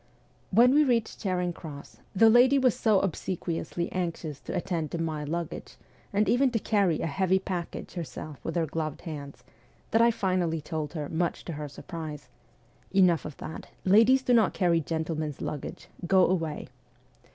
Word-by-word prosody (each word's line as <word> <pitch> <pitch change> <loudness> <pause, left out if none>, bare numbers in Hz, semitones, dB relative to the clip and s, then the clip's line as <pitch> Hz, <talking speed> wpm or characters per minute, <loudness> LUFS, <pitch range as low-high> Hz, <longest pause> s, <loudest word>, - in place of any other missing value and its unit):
When 240 +6 +5
we 300 +1 +6
reached 235 -5 0
Charing 180 -3 -1
Cross, 150 -4 -10 0.2
the 225 +4 +6
lady 245 +5 +6
was 255 -4 +4
so 215 -4 +3
obsequiously 170 -2 -3
anxious 170 -5 -3
to - - -6
attend 170 -4 -2
to 170 - -4
my 160 -2 -2
luggage, 170 +3 -5 0.4
and 210 +1 +2
even 260 +2 +4
to 240 - -1
carry 200 -7 +1
a - - -1
heavy 190 +4 +2
package 185 -3 -5
herself 155 -3 -7
with 165 - -4
her 170 -2 +2
gloved 155 -1 -4
hands, 145 -4 -8 0.5
that 225 - +4
I 235 - +6
finally 185 -7 0
told 150 0 -4
her, 150 -3 -4
much 170 +2 -2
to 170 - -5
her 150 0 -5
surprise: 155 0 -8 0.3
' - - -33
Enough 175 -4 +4
of 150 - -7
that; 160 - -8 0.2
ladies 225 +7 +5
do 250 - +2
not 225 -5 +4
carry 170 -2 +3
gentlemen's 160 -2 -3
luggage. 145 - -6 0.2
Go 190 0 +5
away 165 -4 -2
175 Hz, 170 wpm, -28 LUFS, 160-200 Hz, 0.5 s, we